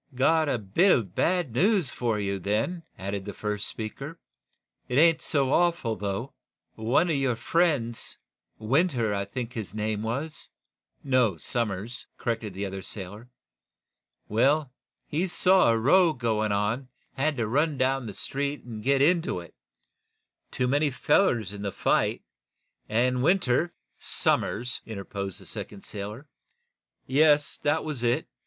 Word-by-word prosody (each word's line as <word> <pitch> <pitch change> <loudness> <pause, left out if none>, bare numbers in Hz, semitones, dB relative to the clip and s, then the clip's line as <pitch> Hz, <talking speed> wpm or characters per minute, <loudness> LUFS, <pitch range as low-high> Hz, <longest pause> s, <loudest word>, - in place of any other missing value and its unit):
"Got 155 +4 +3
a 130 - +1
bit 115 - +3
of 100 -8 +1
bad 175 - +1
news 185 - +2
for 115 -3 -1
you, 100 -1 -2
then," 110 - -1 0.2
added 100 +1 -4
the 100 0 -7
first 105 -1 -2
speaker. 135 +9 -6 0.7
"It 125 - -1
ain't 165 +1 +5
so 135 -3 +1
awful 170 -10 +2
bad, 95 - -16
though. 100 +6 -3 0.4
One 120 +10 +2
of - - +1
your 135 -3 +1
friends 140 -6 0 0.4
Winter, 120 - +1
I 100 0 -1
think 120 +4 -5
his 105 -4 -6
name 105 0 -1
was 140 +8 -4 0.3
" - - -67 0.3
"No; 125 -9 +2
Somers," 115 +4 -3
corrected 115 -5 -3
the 100 +1 -3
other 95 0 -5
sailor. 100 +5 -9 1.0
"Well, 135 +6 +2 0.3
he 170 +6 -1
saw 185 -3 +4
a 115 - +2
row 160 +8 +5
going 110 -4 0
on, 105 +4 +1
and 135 - -17 0.3
he - - -3
had 155 0 +1
to 115 - 0
run 145 +5 +1
down 130 -1 +1
the 100 - -7
street 140 +1 -3
and 115 -3 -7
get 140 +1 +3
into 165 - +2
it. 85 -1 -12 1.0
Too 125 - -1
many 145 +3 +2
fellers 125 - +2
in 100 - -7
the 100 -1 -2
fight, - - +1 0.7
and 125 +3 +2
Winter 170 0 +2 0.2
" - - -47
"Somers," 125 +4 0
interposed 100 -3 -6
the - - -11
second 100 - -7
sailor. 105 +7 -6 0.8
"Yes; 145 +1 +3
that 155 +2 +1
was 150 -6 -4
it. 120 0 +1
125 Hz, 155 wpm, -27 LUFS, 105-145 Hz, 1.0 s, ain't